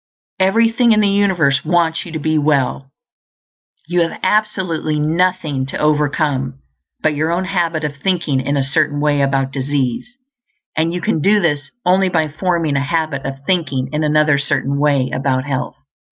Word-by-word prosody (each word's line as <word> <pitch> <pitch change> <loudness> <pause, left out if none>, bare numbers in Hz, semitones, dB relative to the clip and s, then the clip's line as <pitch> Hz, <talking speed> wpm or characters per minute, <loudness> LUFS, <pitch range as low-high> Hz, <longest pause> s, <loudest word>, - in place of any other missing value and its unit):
Everything 230 +4 +3
in 215 - +3
the 210 - +3
universe 185 -9 +2
wants 170 0 0
you - - -9
to 160 - -3
be 155 +1 -1
well; 140 -3 0 1.0
you 175 +1 0
have 165 - -2
absolutely 185 -8 0
nothing 160 -3 0
to - - -5
overcome 145 -3 0 0.4
but 155 - +2
your 155 +3 -1
own 180 +2 -1
habit 170 -4 -1
of 145 -1 -4
thinking 165 -6 0
in 140 +2 -1
a 135 - +1
certain 145 +2 +1
way 145 -1 +1
about 135 -1 0
disease, 140 - -2 0.6
and 160 +1 +1
you 175 0 -4
can 210 -8 0
do 205 +6 +4
this 145 -5 -1 0.2
only 185 +1 +3
by 160 -3 +1
forming 165 -1 -1
a 135 - +1
habit 155 -3 -2
of 135 0 -8
thinking 145 -8 -1
in 150 +1 0
another 150 -1 +3
Certain 140 0 -1
Way 140 -3 +1
about 130 -1 0
health. 135 -3 -3
155 Hz, 170 wpm, -17 LUFS, 140-175 Hz, 1.0 s, do